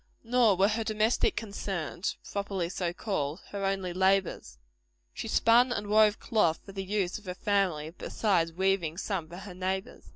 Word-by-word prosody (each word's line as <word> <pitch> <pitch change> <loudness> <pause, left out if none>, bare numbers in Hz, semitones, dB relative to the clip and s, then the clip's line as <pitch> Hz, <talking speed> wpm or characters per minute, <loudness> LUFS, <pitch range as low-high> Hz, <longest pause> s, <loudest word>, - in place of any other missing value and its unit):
Nor 235 -3 +4
were 195 +2 +4
her 225 +1 -1
domestic 215 +1 +1
concerns, 195 -5 -3
properly 195 -4 -2
so 180 -2 -2
called, 175 -5 -3
her 200 -1 -5
only 195 -2 -1
labors. 190 - +1 0.6
She - - -5
spun 240 +2 +4
and 210 -4 -2
wove 215 0 +4
cloth 190 -8 +1
for 195 - -9
the 195 0 -4
use 195 -1 -1
of 210 - -21
her 180 -1 -5
family, 185 -6 0
besides 180 -7 0
weaving 185 -2 0
for - - -3
some 170 -6 -3
of 175 - -8
her 200 -3 -9
neighbors. 190 +1 -4
195 Hz, 170 wpm, -29 LUFS, 180-210 Hz, 0.6 s, Nor